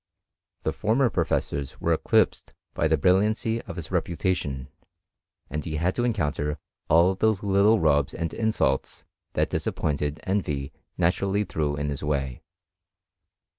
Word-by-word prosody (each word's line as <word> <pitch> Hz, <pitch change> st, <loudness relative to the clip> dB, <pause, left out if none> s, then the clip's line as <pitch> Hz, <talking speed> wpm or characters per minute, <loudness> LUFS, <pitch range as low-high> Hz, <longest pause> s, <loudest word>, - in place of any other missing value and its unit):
The -, -, 0 dB
former 120 Hz, +4 st, +2 dB
professors 70 Hz, -2 st, -1 dB
were 85 Hz, -, +2 dB
eclipsed 80 Hz, -, +1 dB, 0.2 s
by 80 Hz, -, +1 dB
tlie 80 Hz, -1 st, +2 dB
brilliancy 105 Hz, +6 st, +2 dB
of -, -, -6 dB
his 85 Hz, -1 st, -6 dB
reputation, 85 Hz, -6 st, -1 dB, 0.8 s
and 75 Hz, -1 st, -4 dB
he 75 Hz, -, -4 dB
had 85 Hz, +4 st, +1 dB
to 120 Hz, -, -1 dB
encounter 75 Hz, -9 st, -1 dB, 0.3 s
all 85 Hz, +4 st, +5 dB
those 105 Hz, +1 st, +1 dB
little 100 Hz, +2 st, +4 dB
rubs 75 Hz, -4 st, +2 dB
and 85 Hz, 0 st, -3 dB
insults 110 Hz, -12 st, 0 dB, 0.3 s
that -, -, 0 dB
dis -, -, -1 dB
appointed 75 Hz, 0 st, -1 dB
envy 75 Hz, -9 st, -2 dB, 0.2 s
naturally 95 Hz, +4 st, +1 dB
threw 75 Hz, -6 st, -1 dB
in 75 Hz, 0 st, -2 dB
his 70 Hz, -1 st, -4 dB
way. 70 Hz, -4 st, -2 dB
85 Hz, 135 wpm, -26 LUFS, 75-100 Hz, 0.8 s, all